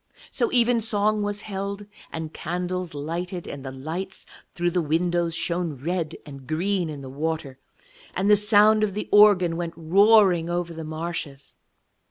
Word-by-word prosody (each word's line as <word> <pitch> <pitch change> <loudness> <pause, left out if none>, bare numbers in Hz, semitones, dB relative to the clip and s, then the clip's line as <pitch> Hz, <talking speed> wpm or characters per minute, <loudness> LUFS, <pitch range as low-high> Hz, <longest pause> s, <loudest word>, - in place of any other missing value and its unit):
So 465 - 0
evensong 220 - +2
was 205 0 -2
held, 200 0 -5 0.3
and 160 -1 -6
candles 180 0 -4
lighted, 170 +4 -4
and 140 - -7
the 135 - -6
lights 160 +9 -6 0.3
through 175 -1 0
the 180 - +1
windows 170 +2 0
shone 170 -2 -2
red 165 +4 -3
and 135 -3 -11
green 175 +3 -1
in 145 -2 -7
the 135 - -8
water, 145 0 -3 0.6
and 190 - 0
the 210 - +7
sound 210 +1 +5
of 200 -2 -1
the 210 - -3
organ 195 -5 +6
went 170 -1 -4
roaring 185 0 +4
over 175 -1 -2
the 160 0 -7
marshes. 155 -3 -6
175 Hz, 155 wpm, -24 LUFS, 160-200 Hz, 0.6 s, the